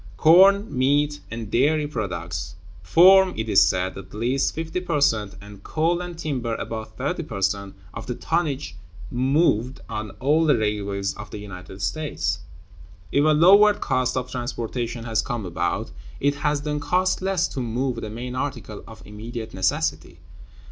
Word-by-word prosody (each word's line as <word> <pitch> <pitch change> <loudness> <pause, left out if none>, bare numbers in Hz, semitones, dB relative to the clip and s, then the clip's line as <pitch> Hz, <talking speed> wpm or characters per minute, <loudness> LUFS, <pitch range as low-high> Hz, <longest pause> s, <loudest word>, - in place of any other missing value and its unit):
Corn, 195 +5 +6
meat, 145 +3 +2
and 115 -2 -6
dairy 150 +4 +2
products 90 - -4 0.3
form, 185 - +6
it 110 0 -3
is 100 - +5
said, 90 0 0
at 95 0 -10
least 125 +5 0
50 160 +2 -3
per 170 -5 -1
cent, 105 -7 +1
and 100 -1 -12
coal 165 - 0
and 175 -2 -7
timber 125 -8 -2
about 110 -1 -6
30 - - -2
per 100 - -6
cent, 100 0 -1 0.2
of - - -7
the 125 - -3
tonnage 140 - -2 0.4
moved 130 -1 +1
on 110 0 -4
all 155 +5 +2
the 145 - +4
railways 100 -2 -1
of 105 0 -9
the - - -7
United 95 -1 -9
States. 95 - -2 0.7
If 140 - +3
a - - +3
lowered 195 +7 +6
cost 130 0 0
of 125 0 -3
transportation 120 -1 -4
has 115 -2 0
come 120 -4 -4
about, 90 - -2 0.3
it 140 +1 +2
has 150 -1 0
then 150 0 -2
cost 185 +7 +1
less 190 -2 +1
to - - -5
move 125 +1 -2
the 110 - -5
main 120 +3 -6
articles 130 -5 -5
of 110 -1 -13
immediate 110 +2 -7
necessity. 80 -4 -1
125 Hz, 160 wpm, -23 LUFS, 105-150 Hz, 0.7 s, Corn